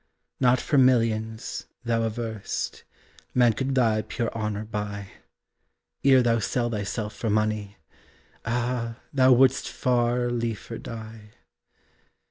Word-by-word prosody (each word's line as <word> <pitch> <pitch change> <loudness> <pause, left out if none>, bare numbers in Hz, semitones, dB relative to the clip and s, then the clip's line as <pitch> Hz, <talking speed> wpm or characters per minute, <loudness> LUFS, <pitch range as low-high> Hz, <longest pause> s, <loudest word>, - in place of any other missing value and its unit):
Not 125 -1 +4
for 145 +2 +2
millions, 115 -3 +1 0.2
thou 115 -1 +1
averrest, 110 -2 -4 0.5
Man 120 -2 +5
could 135 +4 -2
thy 110 -4 +3
pure 115 +1 -3
honor 105 -1 -2
buy, 105 -2 -5 0.9
Ere 130 -2 +6
thou 115 -1 +2
sell 120 +3 -1
thyself 105 0 -3
for 115 - -2
money 105 -1 0 0.7
Ah, 120 0 -2 0.2
thou 130 -2 +5
wouldst 130 +1 +4
far 120 0 +1
liefer 115 -1 -3
die. 110 -2 -9
115 Hz, 110 wpm, -26 LUFS, 110-125 Hz, 0.9 s, Ere